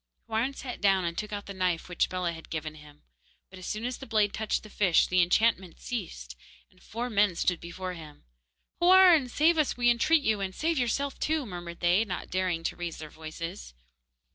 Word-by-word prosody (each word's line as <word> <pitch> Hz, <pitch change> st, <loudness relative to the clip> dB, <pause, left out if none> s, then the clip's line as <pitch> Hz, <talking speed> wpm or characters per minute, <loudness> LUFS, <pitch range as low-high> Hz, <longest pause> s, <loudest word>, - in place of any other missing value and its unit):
Houarn 235 Hz, +5 st, -1 dB
sat 255 Hz, -3 st, -7 dB
down 195 Hz, -2 st, +3 dB
and 170 Hz, 0 st, -2 dB
took 210 Hz, +3 st, -4 dB
out 205 Hz, -1 st, -5 dB
the 200 Hz, -, -7 dB
knife 185 Hz, -3 st, -1 dB
which 180 Hz, -1 st, 0 dB
Bellah 180 Hz, -2 st, -2 dB
had 165 Hz, 0 st, -11 dB
given 155 Hz, -1 st, -4 dB
him, 150 Hz, -1 st, -16 dB, 0.5 s
but 190 Hz, -, -11 dB
as 185 Hz, -, -8 dB
soon 215 Hz, +2 st, -3 dB
as 250 Hz, 0 st, -4 dB
the 270 Hz, -, -9 dB
blade 215 Hz, -3 st, +2 dB
touched 220 Hz, -1 st, -2 dB
the 215 Hz, -, -12 dB
fish 190 Hz, -6 st, +3 dB
the 185 Hz, 0 st, +3 dB
enchantment 185 Hz, 0 st, +1 dB
ceased, 165 Hz, -, -6 dB, 0.4 s
and 185 Hz, -1 st, -25 dB
four 235 Hz, +3 st, -5 dB
men 205 Hz, -5 st, +2 dB
stood 180 Hz, 0 st, 0 dB
before 185 Hz, +2 st, -6 dB
him. 155 Hz, -4 st, -12 dB, 0.6 s
'Houarn, 355 Hz, -6 st, +6 dB
save 320 Hz, +5 st, +3 dB
us, 300 Hz, -, +1 dB
we 240 Hz, -1 st, +4 dB
entreat 295 Hz, +6 st, +3 dB
you, 215 Hz, -4 st, +1 dB
and 190 Hz, -1 st, -4 dB
save 325 Hz, -1 st, 0 dB
yourself 270 Hz, +3 st, -1 dB
too!' 310 Hz, -2 st, 0 dB
murmured 175 Hz, -4 st, -8 dB
they, 175 Hz, +5 st, +3 dB
not 185 Hz, -5 st, -6 dB
daring 185 Hz, -3 st, -1 dB
to -, -, -2 dB
raise 175 Hz, -2 st, -5 dB
their 155 Hz, -1 st, -9 dB
voices. 155 Hz, -, -8 dB
190 Hz, 205 wpm, -28 LUFS, 170-240 Hz, 0.6 s, Houarn